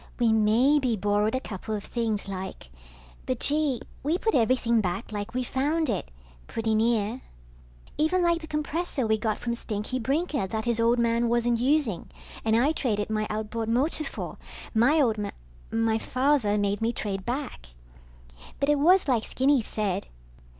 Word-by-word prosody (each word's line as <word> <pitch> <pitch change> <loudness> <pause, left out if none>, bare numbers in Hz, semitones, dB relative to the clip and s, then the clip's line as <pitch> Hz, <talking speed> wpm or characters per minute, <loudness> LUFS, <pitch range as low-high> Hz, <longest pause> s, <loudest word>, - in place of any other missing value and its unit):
We 235 -2 +3
maybe 240 +4 +3
borrowed 205 +3 +1
a - - +1
couple 215 -2 -5
of 205 - -5
things, 220 -4 -2
like. 190 - -6 0.6
But, 255 -2 -1
gee, 290 -4 +1 0.2
we 305 +5 +1
put 445 +3 0
everything 235 -1 +3
back 190 +3 -3
like 210 +2 -5
we 255 - 0
found 290 +3 0
it, 195 - -3 0.4
pretty 225 -1 -1
near. 225 +1 +1 0.8
Even 350 +4 +2
like 340 -1 +2
the 315 - -8
compressor 300 -2 -2
we 220 0 +1
got 215 0 -1
from 235 -1 -3
Stinky 225 +2 -3
Brinker 280 - 0
that 220 +3 -3
his 235 -1 0
old 230 +1 +3
man 235 0 +2
wasn't 240 0 +2
using 255 - +1 0.3
and 220 0 +2
I 255 +6 +4
traded 220 -9 -1
my 215 0 0
outboard 220 +1 -3
motor 275 +7 +1
for, - - -6 0.3
my 250 +8 +4
old 225 -7 +2
m... 205 - -2 0.4
my 225 0 +1
father 255 -5 +1
made 205 0 0
me 225 +1 +2
trade 195 -4 -3
back. 245 - -4 0.9
But 280 - +1
it 295 -1 +3
was 360 +4 +5
like 240 -5 +2
Skinny 270 +2 +2
said 205 -3 -2
235 Hz, 165 wpm, -27 LUFS, 215-275 Hz, 0.9 s, was